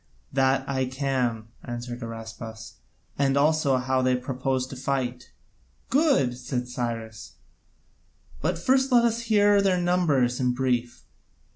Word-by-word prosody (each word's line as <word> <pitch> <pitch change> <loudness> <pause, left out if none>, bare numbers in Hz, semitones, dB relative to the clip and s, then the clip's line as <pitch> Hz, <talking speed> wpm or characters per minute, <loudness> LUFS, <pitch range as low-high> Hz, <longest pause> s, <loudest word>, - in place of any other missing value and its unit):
"That 135 0 +2
I 130 -1 0
can," 130 -4 -2
answered 120 0 -6
Araspas, 115 0 -8 0.4
"and 140 -1 +2
also 145 -2 +3
how 130 +1 0
they 130 0 +2
propose 130 0 -2
to 130 - -9
fight." 125 -2 -3 0.6
"Good," 265 - +3
said 125 -1 -3
Cyrus, 115 -3 -5 1.1
"but - - 0
first 265 +8 +2
let 240 -1 +5
us 230 0 +1
hear 205 -1 +5
their 190 -2 +2
numbers 155 -9 +2
in 125 -1 +1
brief." 125 -2 -1
130 Hz, 125 wpm, -26 LUFS, 125-145 Hz, 1.1 s, let